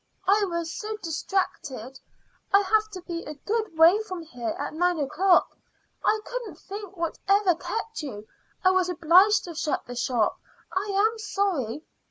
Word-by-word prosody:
"I 405 +2 +4
was 340 -2 -3
so 430 0 -4
distracted; 315 - -3 0.5
I 395 - +6
have 430 +2 +2
to 370 -2 -7
be 340 -2 -5
a 300 - -7
good 420 +2 -3
way 340 +6 +7
from 370 -5 -6
here 245 -8 -4
at - - -4
nine 355 +2 +1
o'clock, 355 +6 +3 0.5
I 435 - +3
couldn't - - -5
think 395 -1 -9
whatever 380 +3 +2
kept 450 +6 -4
you. 215 -8 -7 0.4
I 370 - +6
was 370 -1 +2
obliged 360 +5 +5
to 345 - -7
shut 310 -2 -2
the 245 - -7
shop. 240 -3 0 0.3
I 380 +2 -1
am 435 +3 +2
sorry." 350 - -1
360 Hz, 160 wpm, -26 LUFS, 315-405 Hz, 0.5 s, way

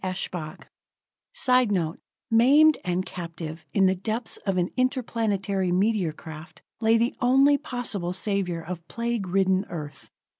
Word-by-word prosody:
Eshbach_ 180 -4 -5 0.7
[Sidenote: 240 - +2 0.3
Maimed 285 +7 +6
and 180 +1 -1
captive, 165 -2 -7
in 195 -2 +3
the 185 - +4
depths 220 +5 -3
of 195 -1 +1
an 180 0 0
interplanetary 215 -7 0
meteor 190 -2 +1
craft, 160 +1 -11 0.2
lay 225 0 +4
the 235 +2 +1
only 270 +3 +5
possible 245 - -3
savior 185 -3 -2
of 170 -1 -7
plague 235 -4 -2
ridden 190 +1 +2
Earth. 150 -4 -8
195 Hz, 125 wpm, -25 LUFS, 175-235 Hz, 0.7 s, Maimed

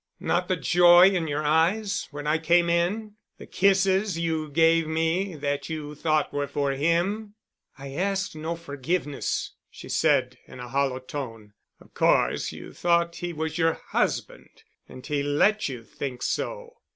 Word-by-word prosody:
"Not - - 0
the - - +1
joy 175 +1 +6
in 175 -4 -1
your 150 0 -2
eyes 175 +8 +1
when 145 0 -8
I 155 +2 +1
came 170 +1 +3
in? 205 +5 -1 0.2
The - - -11
kisses 195 0 +2
you 160 -2 -2
gave 165 +1 +3
me 165 +4 -1
that 145 -1 -3
you 150 -2 -5
thought 155 0 0
were 145 0 -1
for 140 0 -1
him?" 175 +9 0 0.4
"I 135 0 -8
ask 195 +4 -1
no 160 +2 -4
forgiveness," 150 -1 -3 0.2
she - - -12
said - - +1
in - - -12
a 125 0 -8
hollow 135 0 0
tone. 120 -6 -7 0.3
"Of - - -20
course - - +2
you - - -10
thought 170 -1 +1
he 175 0 -4
was 160 0 -4
your 165 -1 +3
husband. - - -3 0.3
And 130 - -11
he 145 -1 -1
let 150 +9 +2
you 125 -4 -7
think 125 +1 -6
so." - - -3
160 Hz, 160 wpm, -25 LUFS, 145-180 Hz, 0.4 s, joy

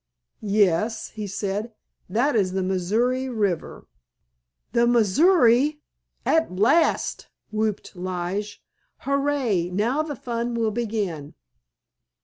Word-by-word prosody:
"Yes," 205 +1 +1
he 215 -2 -6
said, 205 +3 -3 0.4
"that 245 +8 +1
is 190 -4 +1
the 190 0 0
Missouri 225 +8 0
River." 205 -8 -2 0.9
"The 235 +1 +3
Missouri—at 280 - +2
last!" 230 - +2 0.2
whooped 215 -2 -2
Lige, 185 +3 -4 0.4
"hurray, 275 -10 0
now 225 +10 0
the 310 -2 -4
fun 235 0 -3
will 225 -2 0
begin!" 205 -10 -3
220 Hz, 95 wpm, -24 LUFS, 195-245 Hz, 0.9 s, The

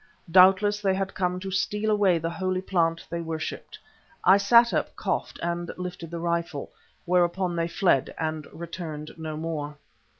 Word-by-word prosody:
Doubtless, 195 +3 +5
they 195 -2 +2
had 195 0 -2
come 180 -1 -1
to 195 0 -5
steal 210 +3 0
away 200 -4 +3
the 165 +1 -3
holy 185 +2 -2
plant 165 -3 0
they 170 0 -2
worshipped. 160 -1 -5 0.5
I 190 +2 +8
sat 235 +4 +5
up, - - -1
coughed, - - -2
and 170 0 -2
lifted 180 -2 -6
the 170 - -5
rifle, 170 -3 -2 0.3
whereon 180 0 +1
they 165 0 0
fled 170 -6 +2
and 155 -2 -3
returned 160 -3 -7
no 155 -1 -6
more. 150 -2 -4
175 Hz, 160 wpm, -26 LUFS, 165-190 Hz, 0.5 s, I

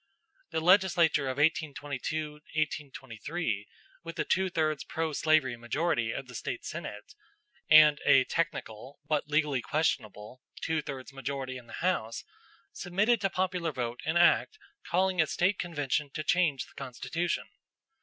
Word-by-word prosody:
The 160 -1 -2
legislature 175 -5 +4
of 130 0 -3
1822 150 0 -1 0.5
23, 115 - -4 0.4
with 165 0 -8
a - - +1
two 190 0 +1
thirds 155 -4 0
pro 160 -1 -3
slavery 155 -5 +2
majority 120 0 -1
of 135 - -5
the 125 - -11
State - - -5
Senate, - - -7 0.6
and 155 -1 +8
a 135 - +6
technical, 130 -5 -3
but 150 -1 0
legally 150 -3 +1
questionable, 115 -5 -2 0.2
two 160 -1 -1
thirds 135 -1 -7
majority 135 -1 -4
in 125 -2 -10
the 115 - -8
House, 115 -11 -1 0.5
submitted 205 +6 +1
to 195 - +1
popular 180 -3 -1
vote 120 -3 -4
an 160 +2 0
act 175 - +4 0.3
calling 185 0 +2
a 160 - +1
State 190 +6 +1
convention 150 -3 -1
to 155 - -2
change 155 -7 +2
the - - -20
constitution. 135 +6 -3
150 Hz, 140 wpm, -30 LUFS, 130-170 Hz, 0.6 s, and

